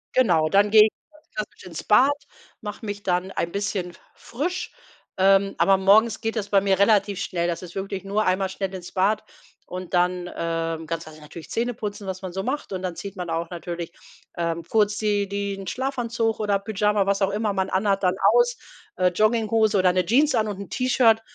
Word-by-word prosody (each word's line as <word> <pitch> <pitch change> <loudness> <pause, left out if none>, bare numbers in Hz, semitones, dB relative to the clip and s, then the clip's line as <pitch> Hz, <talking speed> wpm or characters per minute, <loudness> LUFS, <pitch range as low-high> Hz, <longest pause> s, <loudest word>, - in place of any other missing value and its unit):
Genau, 165 -11 +4
dann 200 +3 +3
gehe 215 -1 +9
ich 215 - -1 0.2
ganz 305 0 -23
klassisch 215 -1 -6
ins 165 -3 -7
Bad, 260 +7 +5 0.5
mache 210 +1 -7
mich 205 -1 -5
dann 180 0 0
ein 170 - -2
bisschen 200 -3 -3 0.2
frisch, 345 +10 -4 0.5
ähm, 195 +1 +4
aber 195 - +5
morgens 210 +4 +4
geht 225 +1 -2
das 205 -1 -2
bei 200 -1 +4
mir 195 -1 +1
relativ 200 -1 +3
schnell. 170 -4 -1
Das 170 - -3
ist 180 0 -10
wirklich 195 0 -4
nur 205 +2 0
einmal 185 +1 +1
schnell 190 0 -4
ins 180 -2 -8
Bad 205 +3 +1 0.4
und 185 0 -7
dann, 180 0 +1
ähm, 165 -1 -3
ganz 165 0 -3
klassisch 155 -1 -13
natürlich 155 +2 -11
Zähne 240 +2 -1
putzen, 205 -2 -6
was 190 -1 -5
man 185 -2 -6
so 190 +2 -4
macht 275 +1 -3
und 185 -1 -3
dann 180 -2 -4
zieht 200 +4 -8
man 180 -2 -5
auch 165 0 -2
natürlich, 170 -1 -6 0.5
ähm, 170 -1 -2
kurz 205 +3 +1
die 205 -2 0
den 200 -1 -4
Schlafanzug 235 -2 -1
oder 205 -2 +1
Pyjama, 210 0 +1
was 200 +1 0
auch 195 - +3
immer 210 0 0
man 190 -1 -1
anhat, 195 +1 +1
dann 180 0 +2 0.2
aus, 485 0 +3 0.4
äh, 185 - +2
Jogginghose 215 +1 +2
oder 185 -1 +4
'ne 185 0 +1
Jeans 285 +7 +3
an 215 - +1
und 200 -2 -5
'n 200 - -9
T-Shirt, 245 -3 +3
195 Hz, 200 wpm, -24 LUFS, 180-215 Hz, 0.5 s, gehe